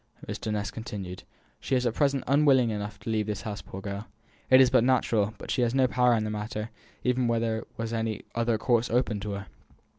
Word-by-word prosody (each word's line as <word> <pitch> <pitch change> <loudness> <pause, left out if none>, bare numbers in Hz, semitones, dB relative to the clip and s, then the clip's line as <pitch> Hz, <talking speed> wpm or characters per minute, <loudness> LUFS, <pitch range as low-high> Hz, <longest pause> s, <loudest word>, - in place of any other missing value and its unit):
Mr. 110 - -4
Ness 105 -1 -2
continued: 100 -5 -6 0.4
"She - - -1
is 125 0 +1
at 120 - +1
present 140 0 +1
unwilling 135 -4 +4
enough 105 0 -4
to - - -6
leave 110 -1 0
this 105 -1 -3
house, 105 -2 -5
poor 95 - -9
girl. 100 +2 -5 0.4
It 130 - +8
is 130 -1 +6
but - - +5
natural; 115 -4 +2
but - - -7
she - - +1
has 120 +1 +1
no 135 -1 +5
power 125 -1 +3
in 110 - 0
the 105 - -2
matter, 105 +1 -4 0.3
even 125 -1 +2
were 115 -1 +2
there 110 -1 -1 0.3
any 110 -1 -2
other 115 -1 +1
course 120 +1 +1
open 120 -3 +1
to 100 0 -4
her. 100 0 -5
115 Hz, 215 wpm, -28 LUFS, 105-125 Hz, 0.4 s, It